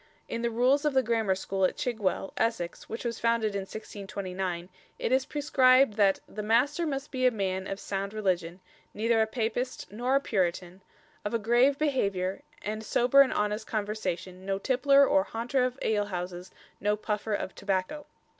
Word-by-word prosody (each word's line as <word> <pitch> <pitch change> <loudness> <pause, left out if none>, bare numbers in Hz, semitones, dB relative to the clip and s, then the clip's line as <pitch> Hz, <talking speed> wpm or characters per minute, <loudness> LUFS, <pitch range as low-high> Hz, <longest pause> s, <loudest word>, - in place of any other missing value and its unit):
In 230 - -3
the 235 - +1
rules 250 +5 +3
of 300 -3 0
the 265 - +4
Grammar 220 -5 +1
School 190 0 -2
at 185 - +2
Chigwell, 215 -5 -1
Essex, 220 -7 -2
which 225 +2 -5
was 235 -1 -2
founded 230 -2 +1
in 200 - -1
1629, 190 -4 -5 0.3
it - - -2
is 260 +1 +2
prescribed 265 -4 +4
that 200 -2 +3
"the 210 - -6
Master 260 +10 +2
must 280 0 -4
be 255 -2 +2
a - - +7
man 190 -4 -2
of 195 - -4
sound 195 0 -3
religion, 185 -4 -1 0.3
neither 225 +1 +2
a 220 - +2
Papist 230 -1 -3
nor 245 +5 0
a - - +5
Puritan, 185 -5 -2 0.4
of 205 +3 -2
a - - +4
grave 240 +5 +3
behaviour, 200 -11 0 0.2
and 215 +1 -4
sober 250 +5 +5
and 275 - +4
honest 210 +1 -1
conversation, 190 -4 -3
no 195 0 -1
tippler 275 +5 +4
or 290 +1 +4
haunter 250 -1 -1
of 255 0 -1
alehouses, 185 -4 -2 0.3
no 210 +1 +1
puffer 210 0 -2
of 190 - -4
tobacco." 200 +10 -2
220 Hz, 175 wpm, -28 LUFS, 195-255 Hz, 0.4 s, a